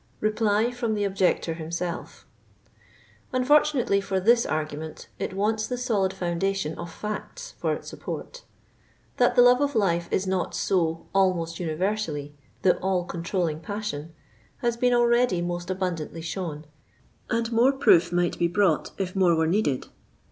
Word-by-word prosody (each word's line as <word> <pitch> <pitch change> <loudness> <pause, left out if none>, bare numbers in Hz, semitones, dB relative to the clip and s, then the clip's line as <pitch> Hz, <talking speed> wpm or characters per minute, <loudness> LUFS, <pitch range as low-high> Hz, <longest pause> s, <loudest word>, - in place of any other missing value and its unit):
REPLV 215 +2 +1
FROM 235 -3 -1
THE 205 - -1
OBJECTOR 190 -4 +1
HIMSELF. 170 +1 -5 1.1
Unfortunately 255 -5 +3
for. 195 -1 -1
this 235 +5 +4
argument, 155 0 -4
it - - -3
wants 215 +2 0
the 250 - -3
solid 215 -7 +1
foundation 190 -2 -1
of 170 - -7
facts 355 - -6
for - - 0
its - - -9
support. - - -7 0.8
That - - +3
the 245 - +7
love 250 +2 +6
of 285 -1 0
life 170 -5 +1
is 190 - +1
not 190 -2 -1
so 165 -3 0
almost 180 -4 +1
universally 165 -3 -2 0.3
the 185 - +4
all 185 -1 0
controlling 170 -2 -2
passion, 165 -4 -5 0.5
hi||. 240 - +3
been 245 +1 +2
already 240 -5 +3
most 175 +1 -3
abundantly 175 -4 -3
shown, 165 -3 -4 0.6
and 230 0 0
more 235 +4 +5
proof 175 -11 +4
might 175 0 0
be 170 - +3
brought 175 -2 +2
if 185 -1 -3
more 180 -3 +4
were 160 0 +2
needed. 160 -6 +1
190 Hz, 145 wpm, -26 LUFS, 170-220 Hz, 1.1 s, the